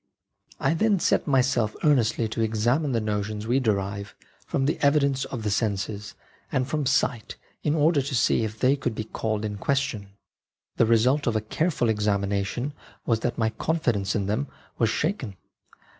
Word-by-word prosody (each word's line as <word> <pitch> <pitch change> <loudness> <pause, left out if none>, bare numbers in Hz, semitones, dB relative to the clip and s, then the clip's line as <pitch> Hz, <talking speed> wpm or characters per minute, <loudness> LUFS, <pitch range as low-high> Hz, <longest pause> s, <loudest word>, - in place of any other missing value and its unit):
" - - -28
I - - +3
then 205 +3 +2
set - - +1
myself 125 -5 +2
earnestly 120 -6 +3
to 115 - -3
examine 120 +7 +1
the 115 - +1
notions 105 0 -2
we 125 +4 +2
derive 100 -4 -2 0.3
from 135 - 0
the 150 - 0
evidence 140 -2 +3
of 120 -4 -6
the 105 - 0
senses 105 -1 -2 0.4
and 130 -1 0
from 145 -1 -1
sight 125 -4 0 0.3
in 150 0 +1
order 155 -1 +3
to 135 0 -3
see 115 -1 +3
if 110 0 -4
they 130 +2 +4
could 125 -5 -3
be 110 - -3
called 110 0 -3
in 105 -1 -4
question. 135 -7 -1 0.7
The 115 - +4
result 125 +6 +3
of 115 - +1
a - - +3
careful 145 +4 0
exami 105 -2 +1
nation 105 +8 -2 0.3
was 115 -2 +2
that 120 +1 -2
my 110 -1 +1
confidence 115 -7 0
in 100 -3 0
them 110 +8 -1 0.3
was 115 - +3
shaken. 130 - -2
115 Hz, 175 wpm, -25 LUFS, 105-140 Hz, 0.7 s, they